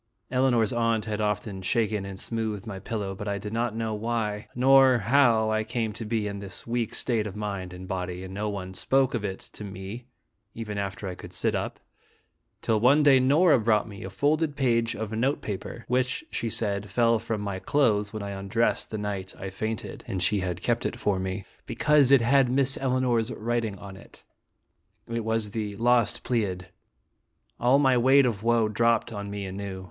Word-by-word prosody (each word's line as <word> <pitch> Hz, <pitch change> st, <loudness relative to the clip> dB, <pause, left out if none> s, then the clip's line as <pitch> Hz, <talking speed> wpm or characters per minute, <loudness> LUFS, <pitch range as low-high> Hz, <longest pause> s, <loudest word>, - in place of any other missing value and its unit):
Elinor's 125 Hz, -4 st, +2 dB
aunt 115 Hz, -2 st, +1 dB
had 110 Hz, -1 st, -2 dB
often 105 Hz, -2 st, -2 dB
shaken 105 Hz, +1 st, 0 dB
and 95 Hz, -1 st, -7 dB
smoothed 110 Hz, -3 st, -3 dB
my 100 Hz, -4 st, -6 dB
pillow, 100 Hz, -1 st, -4 dB
but 105 Hz, +2 st, -7 dB
I 100 Hz, 0 st, -1 dB
did 105 Hz, +2 st, -6 dB
not 115 Hz, -1 st, -1 dB
know 110 Hz, -1 st, -2 dB
why 105 Hz, -1 st, -2 dB
nor 130 Hz, 0 st, +6 dB
how 115 Hz, -2 st, +3 dB
I 110 Hz, 0 st, +1 dB
came 110 Hz, -1 st, -2 dB
to 115 Hz, +1 st, -5 dB
be 110 Hz, -1 st, -1 dB
in 100 Hz, -1 st, -4 dB
this 100 Hz, -1 st, -8 dB
weak 115 Hz, -1 st, -2 dB
state 110 Hz, -3 st, 0 dB
of 100 Hz, -, -8 dB
mind 100 Hz, -3 st, -4 dB
and 90 Hz, +1 st, -9 dB
body, 90 Hz, -1 st, -4 dB
and 95 Hz, 0 st, -8 dB
no 105 Hz, +2 st, -2 dB
one 95 Hz, -2 st, -5 dB
spoke 135 Hz, +7 st, +1 dB
of 115 Hz, -4 st, -2 dB
it 95 Hz, -2 st, -3 dB, 0.2 s
to -, -, -9 dB
me 100 Hz, +5 st, -7 dB, 0.5 s
even 105 Hz, -3 st, -4 dB
after 100 Hz, +1 st, -4 dB
I 90 Hz, -, -4 dB
could -, -, -11 dB
sit -, -, 0 dB
up, -, -, -3 dB, 0.8 s
till 110 Hz, -1 st, +2 dB
one 135 Hz, +7 st, +5 dB
day 140 Hz, -2 st, +7 dB
Nora 145 Hz, +3 st, +5 dB
brought 110 Hz, -1 st, +2 dB
me 100 Hz, -3 st, -9 dB
a 95 Hz, -, -5 dB
folded 145 Hz, -, +1 dB
page 115 Hz, -4 st, +1 dB
of 110 Hz, 0 st, -4 dB
note 125 Hz, +6 st, 0 dB
paper, 105 Hz, +3 st, -6 dB
which, 130 Hz, -, 0 dB
she 115 Hz, -, -2 dB
said, 100 Hz, -2 st, -1 dB
fell 115 Hz, +2 st, +3 dB
from 110 Hz, 0 st, -3 dB
my 100 Hz, -2 st, -3 dB
clothes 105 Hz, -6 st, +1 dB
when 110 Hz, -2 st, -5 dB
I 100 Hz, -, -4 dB
was 100 Hz, -, -5 dB
undressed 115 Hz, +4 st, 0 dB
the 110 Hz, -, -4 dB
night 100 Hz, -2 st, -4 dB
I 95 Hz, 0 st, -5 dB
fainted, 110 Hz, +2 st, -4 dB
and 95 Hz, -, -2 dB
she 100 Hz, +2 st, +2 dB
had 90 Hz, -2 st, -3 dB
kept 120 Hz, -1 st, +1 dB
it -, -, -2 dB
for 100 Hz, -5 st, 0 dB
me, 95 Hz, +1 st, -4 dB
" -, -, -35 dB
because 150 Hz, -3 st, +3 dB
it 135 Hz, -3 st, +6 dB
had 135 Hz, +2 st, +4 dB
Miss 135 Hz, +1 st, +2 dB
Elinor's 125 Hz, -3 st, +1 dB
writing 115 Hz, -2 st, -2 dB
on 95 Hz, 0 st, -10 dB
it." -, -, -16 dB, 0.8 s
It 115 Hz, -1 st, -3 dB
was 110 Hz, -1 st, -1 dB
"The 105 Hz, -2 st, -3 dB
Lost 120 Hz, 0 st, +2 dB
Pleiad." 100 Hz, -7 st, -1 dB, 0.9 s
All 125 Hz, +3 st, +4 dB
my 135 Hz, -3 st, +4 dB
weight 135 Hz, +3 st, +6 dB
of 110 Hz, -5 st, -1 dB
woe 115 Hz, -1 st, +3 dB
dropped 115 Hz, +2 st, +1 dB
on 100 Hz, -1 st, -5 dB
me 100 Hz, -1 st, -4 dB
anew. 95 Hz, 0 st, -5 dB
110 Hz, 200 wpm, -27 LUFS, 100-120 Hz, 0.9 s, day